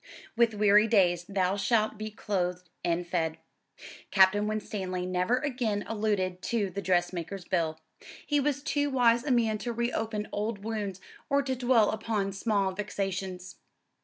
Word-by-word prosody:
"With 230 -2 +3
weary 210 +1 +5
Days 175 -5 +3
thou 190 -1 +1
shalt 215 +1 +1
be 215 0 -4
clothed 180 -5 -3
and 175 0 0
fed." 165 -2 -1 0.7
Captain 200 +2 +4
Winstanley 190 -4 -3
never 185 +6 +1
again 245 -7 -1
alluded 205 -4 -1
to 210 -4 -1
the 200 - -4
dressmaker's 175 0 -1
bill. 160 -4 -1 0.5
He 295 -1 +2
was 285 0 0
too 290 -1 0
wise 240 -3 +3
a 295 - -3
man 225 -4 +2
to 240 - -3
reopen 225 -2 -2
old 210 -1 -3
wounds 205 -4 -4 0.3
or 280 0 +3
to 265 -1 -1
dwell 245 -3 +3
upon 215 -3 -1
small 200 -1 0
vexations. 190 -2 -4
205 Hz, 145 wpm, -29 LUFS, 185-230 Hz, 0.7 s, weary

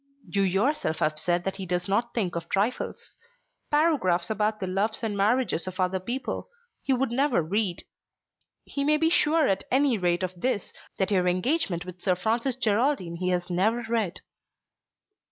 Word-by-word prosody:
"You 200 - 0
yourself 195 - +1
have 155 0 0
said 175 +1 0
that 195 0 -3
he 190 -2 -5
does 180 0 -1
not 235 +5 0
think 190 -7 -1
of 170 -1 -5
trifles. 210 +6 -2 0.5
Paragraphs 275 - +2
about 215 0 0
the 190 - -2
loves 205 +6 -1
and 215 -2 -1
marriages 210 -2 +1
of 185 0 -6
other 185 +1 +1
people 245 - -4 0.3
he - - -1
would 260 -1 +1
never 260 - +2
read. 190 +1 -1 0.8
You 280 - -3
may 300 +1 +4
be 325 +1 +2
sure 315 -2 +3
at 195 0 0
any 265 -4 +3
rate 175 0 +1
of 185 0 -2
this, 250 -6 -1 0.2
that 190 +1 0
your 180 -2 +2
engagement 180 - 0
with 180 -1 -10
Sir 185 -2 +2
Francis 230 +7 0
Geraldine 220 -6 0
he 180 +1 -1
has 180 0 -1
never 220 +7 +1
read." 225 -6 -1
200 Hz, 170 wpm, -27 LUFS, 180-250 Hz, 0.8 s, may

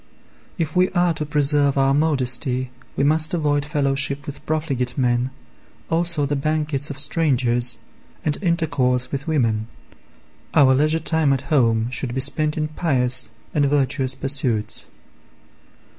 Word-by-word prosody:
If 160 -2 -3
we 180 +1 +3
are 175 -2 +2
to 150 -1 -5
preserve 145 -2 +2
our 135 0 +3
modesty 130 -3 0 0.2
we - - 0
must 155 +3 +3
avoid 145 -3 0
fellowship 140 -1 +1
with 145 - -8
profligate 140 -6 -2
men, 125 -1 +1 0.6
also 165 -2 +2
the 145 +1 -1
banquets 150 0 -1
of 140 - -6
strangers, 125 -5 +1 0.5
and 150 - +1
intercourse 140 -8 0
with 140 +2 -5
women; 115 -8 0 0.9
our 135 -2 +6
leisure 155 +4 +2
time 160 -3 +1
at 135 - -2
home 115 -4 +2
should 125 -1 -3
be 130 - -1
spent 150 +3 0
in 155 0 -2
pious 130 -5 +1 0.3
and 145 -2 +2
virtuous 135 -2 0
pursuits. 130 -5 -1
140 Hz, 135 wpm, -21 LUFS, 130-155 Hz, 0.9 s, our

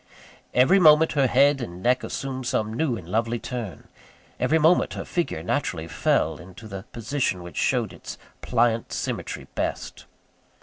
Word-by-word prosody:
Every 150 +11 +5
moment, 160 -2 +6
her 140 -3 +2
head 140 +3 +4
and 90 -5 -7
neck 125 +1 +2
assumed 130 -2 -4
some 110 -2 -1
new 125 -1 0
and 85 - -10
lovely 115 +5 0
turn 115 -4 -6 0.5
every 160 - +2
moment 160 +3 +3
her - - -5
figure 170 - -2
naturally 80 0 -2
fell 80 +1 +1
into 95 +5 -12
the 95 -1 -8
position 115 -5 -2
which 85 - -10
showed - - 0
its - - -9 0.2
pliant 115 -1 +1
symmetry - - -4
best. - - -4
120 Hz, 155 wpm, -25 LUFS, 95-140 Hz, 0.5 s, moment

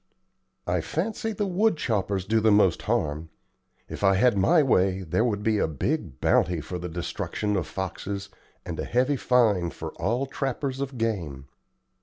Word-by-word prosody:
"I 90 -1 0
fancy 215 - -2
the 205 -1 -2
wood 195 0 +2
choppers 100 -8 -1
do 110 +2 +2
the 110 0 +3
most 105 -4 +4
harm. 75 +2 -1 0.6
If - - -7
I 95 -1 +5
had 120 +4 +4
my 155 - +4
way, 95 -7 +2
there 90 +6 +1
would 105 -4 -1
be 110 -1 +2
a - - +2
big 80 - -3
bounty 85 0 +2
for 90 +4 -6
the 90 +1 -5
destruction 95 +4 -3
of 90 -5 -1
foxes, 100 +3 -5 0.4
and - - -5
a - - -2
heavy 130 +4 +1
fine 110 -9 +2
for - - -7
all 120 +9 0
trappers 135 0 -3
of 135 -1 -4
game. 85 - -2
105 Hz, 170 wpm, -26 LUFS, 90-130 Hz, 0.6 s, I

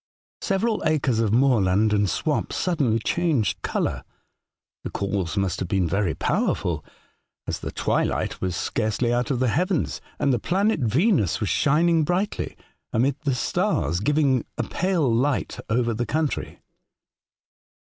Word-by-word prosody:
Several 210 +3 0
acres 140 -7 +1
of 110 -3 +1
moorland 110 -5 +3
and 105 -2 +2
swamp - - -1
suddenly 145 -11 +1
changed 140 - 0
colour. - - -2 0.8
The - - -4
cause 100 -1 -2
must 95 -3 0
have 90 - -3
been 95 -3 +1
very 95 0 0
powerful, - - 0 0.6
as - - -3
the - - -5
twilight - - -1
was 90 -2 -1
scarcely 115 +5 -1
out 120 0 0
of 135 - +1
the 125 0 +1
heavens, 180 - 0 0.2
and 140 - +2
the 120 - +1
planet 195 - +1
Venus 130 - +2
was - - -1
shining 165 +2 +3
brightly 180 +6 -2 0.3
amid 130 +4 +2
the 135 -3 +1
stars, 85 - 0
giv 145 +9 0
ing 135 -5 +3
a - - 0
pale 180 -5 0
light 125 +4 0
over 115 0 +1
the 120 +1 -2
country. 155 +3 -2
125 Hz, 145 wpm, -24 LUFS, 105-155 Hz, 0.8 s, moorland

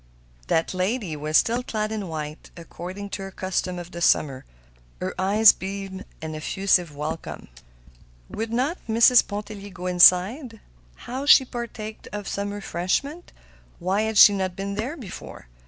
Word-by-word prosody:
That 165 - 0
lady 185 -1 -2
was 155 +1 +1
still 235 +2 +2
clad 215 -3 -3
in 210 -3 -4
white, 155 -1 -6
according 185 +4 -8
to - - -5
her 195 - -6
custom 185 -1 -3
of 175 0 -8
the 170 - -7
summer. 135 -5 +2 0.5
Her 185 - -3
eyes 205 +3 +6
beamed 195 0 -7 0.2
an 160 0 -5
effusive 175 0 0
welcome. 155 +3 -6 0.8
Would 225 +1 -5
not 265 +9 -1
Mrs. 230 +2 +6
Pontellier 205 -1 -7
go 180 -1 -9
inside? 185 - +4 0.5
Would 265 +4 -3
she 265 - +8
partake 230 -3 -7
of 205 -1 -6
some 200 0 -3
refreshment? 205 - -3 0.5
Why 185 +4 0
had 220 -1 -1
she 205 - +9
not 190 -2 -2
been 200 +1 -4
there 240 +10 -4
before? 220 - -10
195 Hz, 150 wpm, -24 LUFS, 180-220 Hz, 0.8 s, she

